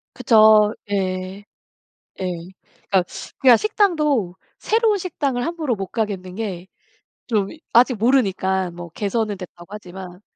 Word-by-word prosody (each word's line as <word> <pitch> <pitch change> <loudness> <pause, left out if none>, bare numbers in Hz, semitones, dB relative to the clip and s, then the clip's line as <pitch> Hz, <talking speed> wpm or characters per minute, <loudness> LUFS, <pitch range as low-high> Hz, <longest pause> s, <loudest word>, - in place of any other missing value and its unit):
그쵸. 215 -3 +5 0.2
예. 190 0 -3 0.8
예. - - -2 0.7
그러니까 190 -2 +4 0.4
그냥 250 -3 +7
식당도 300 - +1 0.2
새로운 445 -1 +2
식당을 280 -8 -2
함부로 320 -7 -2
못 195 -1 -5
가겠는 195 -4 -4
게 190 -5 -5 0.6
좀 205 -4 +1 0.2
아직 250 +2 +5
모르니까. 190 -6 +1
뭐 175 0 -9
개선은 210 +3 -2
됐다고 175 -2 -11
하지만. 185 -2 -9
210 Hz, 255 characters per minute, -21 LUFS, 185-250 Hz, 0.8 s, 그냥